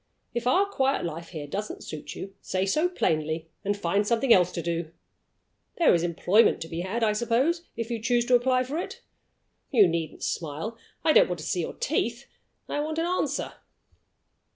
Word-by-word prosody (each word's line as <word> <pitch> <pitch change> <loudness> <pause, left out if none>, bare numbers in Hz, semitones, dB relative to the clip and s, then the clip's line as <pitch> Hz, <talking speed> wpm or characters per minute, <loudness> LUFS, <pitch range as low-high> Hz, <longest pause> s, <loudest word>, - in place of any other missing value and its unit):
If 240 0 -2
our 375 +10 +4
quiet 275 - 0
life 165 0 -5
here 155 -4 -6
doesn't 205 +9 -5
suit 155 - -7
you, 195 0 -7
say 185 0 -1
so 305 - +2
plainly, 160 - -1
and 205 0 0
find 200 +2 0
something 235 +2 +4
else 180 -1 +4
to 170 - -2
do. 170 -1 -2 0.9
There 340 - +5
is 170 - +3
employment 175 +5 +3
to 165 - -4
be 165 0 -5
had, 210 +6 -2
I 215 -1 +3
suppose 255 +10 +1
if 230 0 -3
you 230 -2 -2
choose 240 +1 +2
to 250 - +4
apply 255 +1 +3
for 280 +6 -3
it? - - -6 0.7
You 220 -8 +6
needn't 165 -2 -3
smile. 165 +8 -3 0.3
I 315 - +4
don't - - +6
want 180 - -2
to - - -7
see 175 - 0
your - - -5
teeth - - -1 0.4
I - - -2
want 310 +1 -2
an 330 - +1
answer." 360 +1 -1
210 Hz, 190 wpm, -27 LUFS, 170-260 Hz, 0.9 s, You